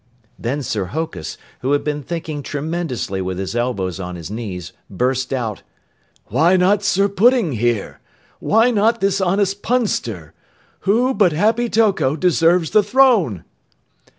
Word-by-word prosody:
Then 135 +5 -2
Sir 105 -5 -2
Hokus, 95 - -5 0.2
who 135 +3 0
had 145 - +1
been 150 -1 -2
thinking 155 -1 -5
tremendously 145 - -3
with 95 -1 -3
his 95 +4 -4
elbows 100 -7 -2
on 90 -1 -5
his 85 +2 -8
knees, 95 -6 -6 0.2
burst 125 +5 -1
out, 115 -6 -3 0.6
"Why 160 - +3
not 195 +3 +3
Sir 200 0 +2
Pudding, 215 - +3
here? 120 -3 -1 0.4
Why 225 +4 +3
not 225 +1 +2
this 195 0 +1
honest 195 +2 0
Punster? 115 - -2 0.6
Who 245 +5 +3
but 195 -9 +3
Happy 225 +8 +1
Toko 205 -11 +2
deserves 170 0 +2
the 215 - +5
throne?" 205 - +3
155 Hz, 140 wpm, -19 LUFS, -, 0.6 s, the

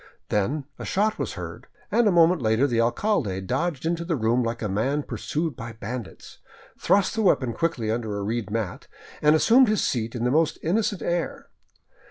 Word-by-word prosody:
Then 130 +8 0
a - - -5
shot 210 +3 0
was - - -2
heard, - - -8 0.2
and 235 -2 +3
a - - +4
moment 170 -1 +4
later 110 +3 +2
the 120 -4 +1
alcalde 120 - 0
dodged 135 - -2
Into 170 0 -1
the 170 -1 -1
room 120 0 +1
like 115 0 -3
a - - 0
man 130 +9 0
pursued 155 0 -3
by 115 0 -7
bandits, 115 0 -8 0.4
thrust 195 -1 +2
the 225 - -1
weapon 130 - +2
quickly 130 -10 -1
under 110 -3 -2
a 100 - -3
reed 110 +1 -2
mat, 105 -4 -4 0.3
and 150 +1 +5
assumed 240 +10 +5
his 215 -1 +1
seat 115 -1 -1
and 120 0 -2
his 125 - +2
most 160 0 +2
innocent 200 +3 0
air. 175 -1 -2
135 Hz, 190 wpm, -25 LUFS, 115-170 Hz, 0.4 s, and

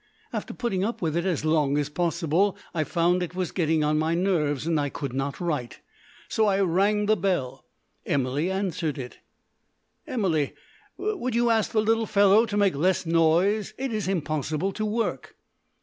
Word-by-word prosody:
After - - -4
putting 195 -6 -2
up 230 +4 -2
with 160 -1 0
it 170 +1 0
as 165 -4 -1
long 150 -3 +2
as 145 -1 0
possible, 170 +4 0 0.2
I 160 -3 0
found 175 +3 +1
it 180 0 -4
was 185 -3 -2
getting 160 -3 +1
on 150 0 +2
my 160 +1 +1
nerves, 160 -6 0
and 165 -2 +1
I 145 -1 0
could 140 -2 -5
not 135 +1 -3
write. 150 -9 -3 0.5
So 220 -1 +1
I 195 -1 +2
rang 200 +3 +2
the 215 +1 +3
bell. 175 -9 -2 0.4
Emily 140 +5 0
answered 185 -6 -2
it. 125 -2 -8 0.9
"Emily, 170 - 0 0.4
will 380 - -2
you 235 0 +3
ask 220 -2 +1
the 215 -1 +2
little 225 0 +1
fellow 205 +2 +5
to 205 -1 -2
make 200 -4 +3
less 180 +6 +1
noise? 170 +6 +2
It's 225 -8 -2
impossible 155 0 -1
to 215 +2 -3
work." 225 +2 -2
175 Hz, 170 wpm, -26 LUFS, 155-205 Hz, 0.9 s, fellow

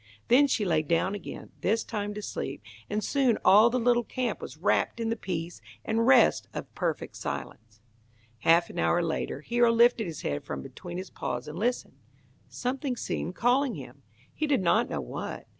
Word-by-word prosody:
Then 275 +4 +6
she 225 -6 0
lay 160 -4 +2
down 165 +5 0
again, 205 -4 -8
this 225 +3 +1
time 205 -2 -4
to 210 - -6
sleep, 135 - -5 0.3
and 210 +1 -1
soon 260 -1 +2
all 215 +4 +7
the 250 +1 0
little 240 0 +3
camp 250 +1 -3
was - - -8
wrapped - - +1
in 230 -1 -1
the 230 - 0
peace 175 -5 -5 0.2
and 225 +2 +1
rest 260 -3 +5
of - - -6
perfect - - -3
silence. 110 -1 -7 0.6
Half 165 +6 +4
an 170 - -6
hour 175 0 +2
later 165 -1 -2
Hero 240 0 +3
lifted 235 -2 +4
his 160 -3 -7
head 70 0 -2
from 70 -1 -5
between 175 - -8
his 185 0 -6
paws 125 - -4
and 155 +3 -6
listened. 230 - -2 0.5
Something 255 +1 -2
seemed 185 -6 -4
calling 250 +2 +2
him. - - -10 0.3
He 310 - -2
did 275 -9 +2
not 220 +7 +3
know - - -2
what. - - -6
215 Hz, 185 wpm, -28 LUFS, 170-240 Hz, 0.6 s, all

